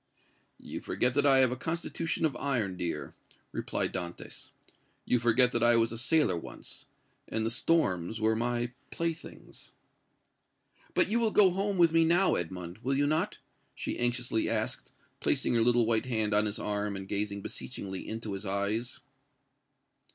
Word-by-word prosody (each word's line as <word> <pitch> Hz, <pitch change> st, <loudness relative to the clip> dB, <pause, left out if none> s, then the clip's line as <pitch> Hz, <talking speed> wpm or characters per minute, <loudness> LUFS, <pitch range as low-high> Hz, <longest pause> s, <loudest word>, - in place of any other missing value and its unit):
"You -, -, -7 dB
forget 125 Hz, 0 st, 0 dB
that 145 Hz, +2 st, +3 dB
I 135 Hz, -1 st, +6 dB
have 130 Hz, -2 st, +4 dB
a -, -, -1 dB
constitution 165 Hz, +3 st, -2 dB
of 145 Hz, -5 st, 0 dB
iron, 120 Hz, -9 st, -1 dB
dear," 90 Hz, -2 st, -4 dB, 0.4 s
replied -, -, -2 dB
Dantès; 85 Hz, -1 st, -6 dB, 0.6 s
"you 125 Hz, -, +2 dB
forget 120 Hz, +2 st, +5 dB
that 120 Hz, -, 0 dB
I 120 Hz, 0 st, +5 dB
was 115 Hz, -1 st, +3 dB
a -, -, -5 dB
sailor 155 Hz, -, +3 dB
once, 85 Hz, -, -8 dB, 0.4 s
and 110 Hz, 0 st, -1 dB
the 115 Hz, -, 0 dB
storms 110 Hz, -, +1 dB
were 110 Hz, 0 st, +2 dB
my 120 Hz, +1 st, -1 dB, 0.2 s
playthings!" 165 Hz, -1 st, -6 dB, 1.2 s
"But -, -, +3 dB
you 230 Hz, +3 st, +2 dB
will 230 Hz, -1 st, +2 dB
go 205 Hz, -3 st, +5 dB
home 195 Hz, +2 st, -1 dB
with 170 Hz, -2 st, +5 dB
me 165 Hz, 0 st, +4 dB
now, 175 Hz, +4 st, +3 dB
Edmond, 90 Hz, +2 st, -4 dB
will 135 Hz, +3 st, -1 dB
you 145 Hz, +1 st, +2 dB
not?" 155 Hz, +2 st, 0 dB, 0.4 s
she -, -, -4 dB
anxiously 120 Hz, -2 st, +1 dB
asked, -, -, -2 dB, 0.3 s
placing -, -, +1 dB
her 115 Hz, -, +3 dB
little 120 Hz, 0 st, +4 dB
white 115 Hz, +2 st, +1 dB
hand 110 Hz, -4 st, 0 dB
on 105 Hz, +1 st, +4 dB
his 105 Hz, -, -2 dB
arm 105 Hz, -1 st, -2 dB
and 95 Hz, 0 st, -6 dB
gazing 100 Hz, 0 st, -2 dB
beseechingly 95 Hz, -7 st, -6 dB
into 110 Hz, -2 st, -5 dB
his 95 Hz, +1 st, -5 dB
eyes. 105 Hz, +4 st, -2 dB
120 Hz, 165 wpm, -30 LUFS, 105-145 Hz, 1.2 s, I